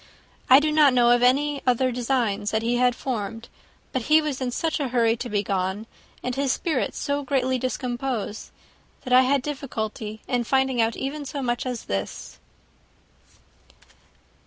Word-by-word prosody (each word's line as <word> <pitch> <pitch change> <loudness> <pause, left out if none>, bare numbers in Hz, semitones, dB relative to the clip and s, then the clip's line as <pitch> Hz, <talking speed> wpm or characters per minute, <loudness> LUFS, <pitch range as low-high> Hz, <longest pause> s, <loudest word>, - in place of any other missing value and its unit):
I 260 +1 +9
do 305 +1 0
not 300 -4 +5
know 240 -1 +5
of 245 0 +4
any 280 +3 +2
other 255 +1 +2
designs 235 -5 -1
that 220 +1 -1
he 240 +1 +1
had 250 0 +3
formed; 225 -3 -4 0.4
but 260 - -1
he 310 +1 +7
was 300 -4 -3
in 255 - -1
such 320 +6 -1
a 280 - -1
hurry 235 -2 +2
to 240 +1 -5
be 205 -1 0
gone, 190 +2 -2 0.4
and 250 - -2
his 275 0 0
spirits 310 -3 -1
so 285 0 -1
greatly 260 -2 0
discomposed, 245 -3 -3 0.5
that 250 - -2
I 255 - +8
had 265 0 +2
difficulty 220 -6 -5
in 245 -2 0
finding 265 0 +1
out 225 0 +1
even 290 +2 -4
so 280 0 -5
much 240 +1 -1
as 245 -3 -4
this." 95 0 -5
250 Hz, 165 wpm, -24 LUFS, 230-270 Hz, 0.5 s, I